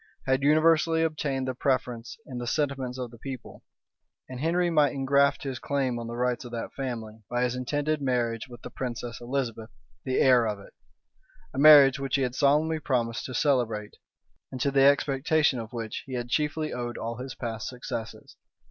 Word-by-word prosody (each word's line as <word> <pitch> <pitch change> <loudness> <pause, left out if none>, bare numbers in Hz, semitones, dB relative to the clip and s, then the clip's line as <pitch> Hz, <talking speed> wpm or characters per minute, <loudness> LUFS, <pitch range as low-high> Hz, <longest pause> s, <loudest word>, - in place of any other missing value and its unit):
had 130 +1 +2
universally 160 +2 +4
obtained 140 -4 -1
the 130 - -1
preference 125 -3 -2
in 125 -4 -6
the 120 - -5
sentiments 135 -3 -1
of 125 -2 -5
the 120 - -14
people; 130 0 -8 0.6
and 130 -1 -7
Henry 170 +4 +1
might 150 -3 +3
ingraft 140 +1 +2
his 135 -3 -4
claim 135 -4 -1
on 115 - -6
the 120 - -5
rights 125 +1 -1
of 120 - -9
that 115 -1 -5
family, 115 -5 -5
by 120 0 0
his 125 0 0
intended 145 +4 -1
marriage 120 -3 -1
with 120 -1 -13
the - - -8
princess 120 -2 -5
Elizabeth, 120 -3 -3 0.3
the 130 -1 -1
heir 125 -3 +5
of 105 -1 -2
it; 100 - -15 0.8
a 130 - -3
marriage 140 -2 +8
which 135 0 -1
he 135 - +1
had 125 -1 -1
solemnly 150 +4 +2
promised 120 -6 -1
to 130 - -6
celebrate, 120 -7 0 0.6
and 130 - -6
to 140 +1 +1
the 135 0 +3
expectation 140 0 +3
of 110 -1 -7
which 115 -3 -5
he 130 - -7
had 120 -1 -3
chiefly 150 +2 -1
owed 120 -1 -4
all 115 0 -4
his 130 +1 -7
past 115 -3 -5
successes. 115 -3 -7
130 Hz, 185 wpm, -27 LUFS, 120-140 Hz, 0.8 s, marriage